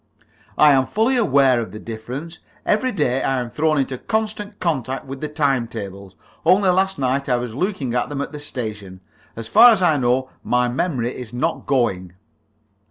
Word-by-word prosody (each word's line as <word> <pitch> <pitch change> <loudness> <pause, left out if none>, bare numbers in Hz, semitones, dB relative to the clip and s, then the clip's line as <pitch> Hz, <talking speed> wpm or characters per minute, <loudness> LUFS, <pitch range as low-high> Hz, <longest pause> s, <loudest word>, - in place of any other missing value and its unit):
"I 150 -1 +7
am 130 -1 +3
fully 225 +5 +1
aware 135 - +3
of 110 - -6
the 105 - -8
difference. 125 +10 -7 0.3
Every 255 +5 +1
day 135 - 0
I 135 -1 0
am 120 -1 -5
thrown 155 0 +1
into 130 -2 -1
constant 215 -2 -3
contact 135 -6 -2
with 135 0 -8
the 155 - -2
time 140 -5 0
tables. 100 -3 -8 0.3
Only 185 +3 +4
last 190 +1 +1
night 135 0 -1
I 125 - +3
was 120 -2 -4
looking 145 - -2
at 125 - 0
them 145 -1 -4
at - - -5
the 150 - -7
station. 105 -9 -6 0.3
As 115 -1 -7
far 230 - +8
as 215 -5 +3
I 160 -4 +4
know, 130 0 0
my 125 0 +1
memory 125 -2 -2
is 125 -2 -8
not 160 +7 -2
going." 95 -10 0
135 Hz, 185 wpm, -21 LUFS, 120-165 Hz, 0.3 s, far